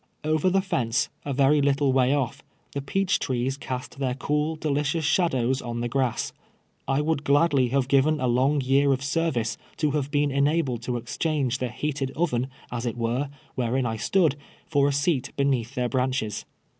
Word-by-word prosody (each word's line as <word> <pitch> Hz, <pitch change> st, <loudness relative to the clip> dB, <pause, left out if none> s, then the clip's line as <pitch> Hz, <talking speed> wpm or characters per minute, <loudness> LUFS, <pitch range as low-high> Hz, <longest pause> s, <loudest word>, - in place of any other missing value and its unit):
Over 155 Hz, +4 st, +2 dB
the 195 Hz, +1 st, +2 dB
fence, 125 Hz, -, 0 dB, 0.2 s
a 145 Hz, -, -2 dB
very 140 Hz, +2 st, +4 dB
little 140 Hz, -1 st, +2 dB
way 130 Hz, -1 st, +3 dB
otf, 140 Hz, -1 st, 0 dB, 0.3 s
the 140 Hz, -, -3 dB
peach 190 Hz, +7 st, 0 dB
trees 130 Hz, +1 st, -1 dB
cast 130 Hz, 0 st, -6 dB
their 130 Hz, -2 st, 0 dB
cool, 150 Hz, +4 st, -1 dB
delicious 150 Hz, +1 st, -1 dB
shadows 135 Hz, -6 st, +2 dB
on 120 Hz, -1 st, -4 dB
the 120 Hz, -, -1 dB
grass. 130 Hz, -1 st, -1 dB, 0.5 s
I 135 Hz, +2 st, +2 dB
would 150 Hz, -1 st, 0 dB
gladly 140 Hz, -3 st, +3 dB
have 130 Hz, +1 st, +1 dB
given 145 Hz, +3 st, +3 dB
a 130 Hz, -, 0 dB
long 130 Hz, +4 st, +2 dB
year 135 Hz, +2 st, +3 dB
of 130 Hz, 0 st, -3 dB
service 140 Hz, -6 st, -1 dB, 0.2 s
to 150 Hz, -2 st, +1 dB
have 140 Hz, -1 st, -1 dB
been 145 Hz, -1 st, +1 dB
ena 145 Hz, +5 st, +2 dB
bled 125 Hz, -5 st, -4 dB
to 120 Hz, +1 st, -2 dB
exchange 130 Hz, +2 st, -1 dB
the 125 Hz, -, -1 dB
heated 135 Hz, +2 st, -2 dB
oven, 130 Hz, -7 st, 0 dB, 0.2 s
as 120 Hz, 0 st, -3 dB
it 120 Hz, -, -3 dB
were, 120 Hz, +4 st, -1 dB, 0.2 s
where 125 Hz, 0 st, 0 dB
in 130 Hz, -, +1 dB
I 110 Hz, -1 st, -2 dB
stood, 160 Hz, -, +2 dB, 0.3 s
for 140 Hz, -1 st, +2 dB
a -, -, +2 dB
seat 140 Hz, -2 st, 0 dB
beneath 135 Hz, -3 st, 0 dB
their 125 Hz, -2 st, 0 dB
branches. 125 Hz, -4 st, -1 dB
135 Hz, 185 wpm, -25 LUFS, 125-150 Hz, 0.5 s, very